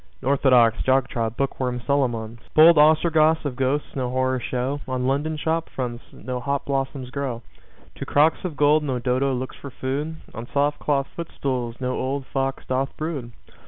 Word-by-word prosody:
Orthodox, 130 -4 +4
jog 130 0 +2
trot, 115 -2 -2
book 135 -1 -2
worm 125 -1 -1
Solomons! 120 -5 0 0.2
Bold 160 0 +8
Ostrogoths 155 +1 +4
of 135 -3 -2
ghosts 135 +3 -1
no 130 -2 -1
horror 130 0 0
show. 130 +4 -2
On 130 -1 -2
London 145 +4 0
shop 165 +2 -1
fronts 120 -2 -4
no 125 -1 -5
hop 140 +2 -2
blossoms 135 -2 -2
grow. 130 -4 -3 0.5
To - - -5
crocks 150 +3 +3
of 170 -6 -4
gold 150 +1 +4
no 135 -4 -1
Dodo 125 +3 +1
looks 130 0 -4
for 140 - -8
food. 140 +5 -3 0.2
On 115 +2 -7
soft 145 +1 +1
cloth 140 -2 +1
footstools 130 -7 -3
no 125 -1 -1
old 135 +1 -2
fox 135 0 -2
doth 130 +1 -1
brood. 150 -7 -4
135 Hz, 170 wpm, -23 LUFS, 125-145 Hz, 0.5 s, Bold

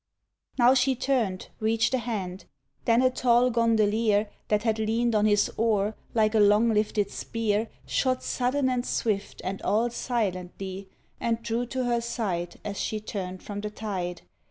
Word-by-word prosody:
Now 245 0 +6
she 265 0 +3
turned, 235 -8 -1
reached 225 +3 +1
a 260 - +2
hand; 200 -6 -4 0.4
then 235 +2 +4
a 255 - +4
tall 250 0 +3
gondolier 220 -2 +2 0.2
That 210 0 +1
had 220 -2 +1
leaned 225 +2 +1
on 210 0 +3
his 205 -1 +3
oar, 215 -2 +1 0.2
like 215 -1 +3
a 220 - +4
long 210 +3 +5
lifted 210 -1 +1
spear, 220 -1 -1 0.2
Shot 255 -1 0
sudden 260 +2 0
and 250 -1 0
swift 210 -5 -2
and 195 +1 -4
all 230 +3 +1
silently 195 -5 -3 0.3
And 230 0 -1
drew 235 +1 -1
to 260 +1 -2
her 240 -1 +1
side 190 -7 -3
as 200 -1 -4
she 215 - -2
turned 185 -3 -6
from 205 -1 -5
the 210 - -3
tide. 185 -5 -4
220 Hz, 160 wpm, -27 LUFS, 205-235 Hz, 0.4 s, Now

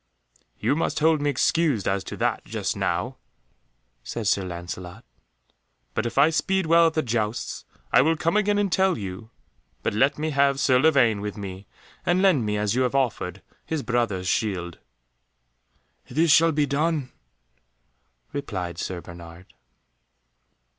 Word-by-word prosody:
"You - - +1
must 165 - -1
hold 155 -1 +3
me 145 - +1
excused 145 - +1
as 95 0 0
to - - -7
that, - - 0
just - - -3
now," - - -2 0.9
said 110 - -5
Sir 100 -1 +2
Lancelot, 90 +3 -7 0.9
"but 115 - -1
if 115 - -7
I 145 +4 +6
speed 190 +3 0
well 165 +1 +5
at 160 - -2
the 155 - +1
jousts, 110 -2 -2 0.3
I - - +7
will 160 +4 +2
come 165 +3 0
again 205 -1 +2
and 205 -2 0
tell 190 -1 +2
you. 100 +3 -7 0.5
But - - 0
let 135 +7 +2
me 155 +1 -2
have 140 -1 +2
Sir 130 -2 +4
Lavaine 130 -8 +3
with 105 0 -5
me, 95 -1 -7 0.4
and 175 +1 +2
lend 180 - +3
me, 105 0 0
as 105 0 0
you 130 - +1
have 125 +1 0
offered, 110 -8 -1 0.2
his 160 -3 -3
brother's 115 -7 -1
shield." 90 -5 -1 1.3
"This 160 +1 +2
shall 165 +2 +6
be 150 -1 +1
done," 145 -2 -1 1.2
replied 90 - -4
Sir 90 -2 -4
Bernard. 85 +1 -12
125 Hz, 155 wpm, -25 LUFS, 100-160 Hz, 1.3 s, I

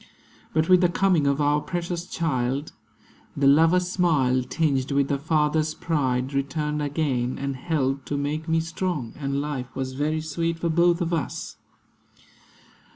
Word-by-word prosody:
But 160 0 +1
with 185 -1 +6
the 180 - +4
coming 175 -4 +2
of 140 +1 +1
our 145 0 +2
precious 175 +1 -4
child, 140 -4 -1 0.7
The 140 - +1
lover's 165 +6 +5
smile, 150 -9 +2
tinged 135 0 0
with 140 0 +1
the 140 - 0
father's 155 +1 +1
pride, 130 -4 -1
Returned 150 +2 -1
again; 140 -4 -1
and 140 0 -3
helped 135 -2 -1
to 145 - -2
make 150 +3 -2
me 165 0 +2
strong; 165 -6 -3
And 140 -1 -1
life 140 -4 -5
was 130 0 -3
very 155 +3 -1
sweet 165 +2 -2
for 170 0 -1
both 170 +2 +3
of 170 0 -1
us. 160 -5 -3
150 Hz, 155 wpm, -25 LUFS, 140-165 Hz, 0.7 s, with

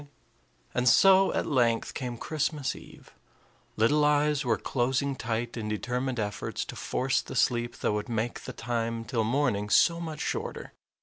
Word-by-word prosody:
And 125 +1 +3
so 195 +7 +6
at - - 0
length 120 -5 +1
came 125 -2 -4
Christmas 150 0 -2
eve. - - -15 0.6
Little 145 +8 +3
eyes 150 0 +2
were 115 -4 +1
closing 135 +2 -1
tight 115 0 -3
in 110 -3 -4
determined 125 +3 -2
efforts 105 -1 -3
to - - -8
force 135 +1 0
the - - -9
sleep 120 -1 +1
that - - 0
would 105 +1 -3
make 115 +1 -2
the - - -6
time 115 -1 -3
till 115 -3 0
morning 115 -4 0
so 170 +10 +4
much 160 -3 -6
shorter. - - -4
125 Hz, 160 wpm, -28 LUFS, 115-145 Hz, 0.6 s, so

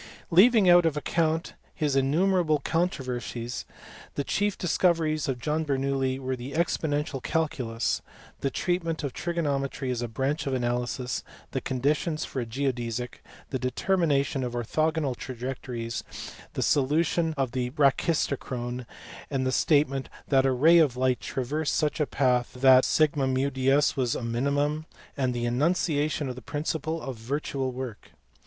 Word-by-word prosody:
Leaving 205 +3 +6
out 175 0 +7
of 160 -3 +1
account 160 +1 0 0.2
his 150 -3 0
innumerable 155 +4 +3
controversies, 125 -7 -2 0.5
the 140 - -1
chief 205 +6 0
discoveries 165 -4 +1
of 135 -2 -1
John 150 +5 -1
Bernoulli 135 -2 0
were 130 -1 -3
the 130 +2 -7
exponential 150 -4 -1
cal 160 +4 +1
culus, 115 -5 -2 0.4
the 135 - 0
treatment 165 +1 -1
of 140 - -3
trigonometry 140 -6 -2
as 120 -1 -2
a 120 - -2
branch 135 +6 -2
of 135 - 0
analysis, 120 0 -2 0.3
the - - -2
conditions 150 +5 0
for 130 - -4
a 120 - -4
geodesic, 120 -1 -3 0.3
the 130 - -1
determination 140 0 +1
of 120 -1 -3
orthogonal 150 +3 0
trajectories, 120 -2 -5 0.5
the - - -1
solution 160 +3 +2
of 135 -3 0
the 125 -1 -1
brachistochrone, 130 -4 0 0.4
the 130 -2 0
statement 140 -1 +2 0.2
that 135 -1 +4
a - - +3
ray 160 +7 +6
of 140 -6 +3
light 130 -1 +2
traversed 145 +4 -2
such 155 0 0
a 150 - +1
path 125 -3 +1
that 130 0 +6
^ds 135 -1 +2
was 125 -3 0
a - - -4
minimum, 145 +6 0 0.3
and 130 -3 0
the 120 0 -1
enunciation 150 +3 +1
of 130 - -3
the 130 - -10
principle 155 +4 -2
of 130 -3 -5
virtual 135 +2 -2
work. 125 -3 -7
135 Hz, 140 wpm, -27 LUFS, 125-155 Hz, 0.5 s, out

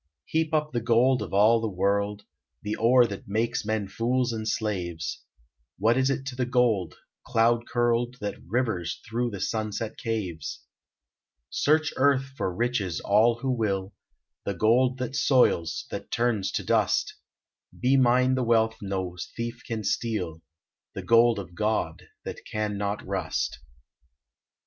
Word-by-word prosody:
Heap 160 0 0
up 155 -1 0
the 120 - -1
gold 120 +3 +3
of - - -5
all 110 +4 +5
the 110 - -1
world, 100 +2 0 0.4
The 105 +1 -2
ore 120 +2 +5
that 100 -4 -6
makes 115 +4 -1
men 105 -1 -1
fools 120 +4 0
and 110 -1 -4
slaves; 90 -7 -2 0.6
What 110 +4 +3
is 130 +1 +2
it 135 -1 -2
to 135 -2 -5
the 125 -1 -1
gold, 120 -8 +1 0.3
cloud 115 -1 +2
curled, 120 0 +1
That 105 -1 -5
rivers 110 -6 -1
through 120 +2 -1
the 100 -4 -6
sunset's 110 +1 -3
caves! 100 -8 -4 0.9
Search 155 +1 +2
Earth 135 0 +4
for 95 - -1
riches 105 -3 -1
all 115 +3 +3
who 135 -1 0
will, 100 -5 -1 0.5
The 100 - -3
gold 125 +7 +3
that 125 +1 -4
soils, 85 - +2
that - - -6
turns 115 -5 0
to - - -1
dust - - +1 0.7
Be 130 +2 +3
mine 130 0 +4
the 130 - +1
wealth 110 -2 +2
no 95 -3 -3 0.2
thief 120 +1 -4
can 115 -3 -3
steal, 100 -6 -2 0.5
The - - -5
gold 115 0 +5
of 90 -3 -7
God 110 +4 -1 0.2
that - - -6
can 105 -1 -1
not 100 +1 -3
rust. - - -2
115 Hz, 150 wpm, -26 LUFS, 100-125 Hz, 0.9 s, all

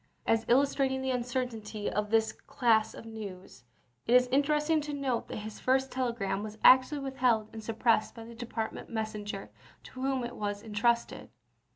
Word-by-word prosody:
As 225 0 +2
illustrating 265 0 +2
the 265 - 0
uncertainty 240 -4 -3
of 210 +1 -1
this 220 0 +3
class 225 -4 +1
of - - -10
news, 200 - -9 0.4
it 240 - +4
is 250 0 +7
interesting 300 +3 +2
to 295 0 -5
note 270 -4 -1
that - - -6
his 215 -1 -8
first 265 +1 +1
telegram 235 -6 -1
was 215 0 -7
actually 260 +3 +6
withheld 250 -5 +1
and 220 -1 -7
suppressed 225 0 +1
by 230 - -8
the 230 +1 -11
de 235 +1 -7
partment 225 -2 -4
messenger 215 -3 -4 0.3
to 255 - -10
whom 265 -1 0
it 240 - -5
was 205 0 -3
intrusted. 235 +2 0
235 Hz, 170 wpm, -30 LUFS, 215-260 Hz, 0.4 s, is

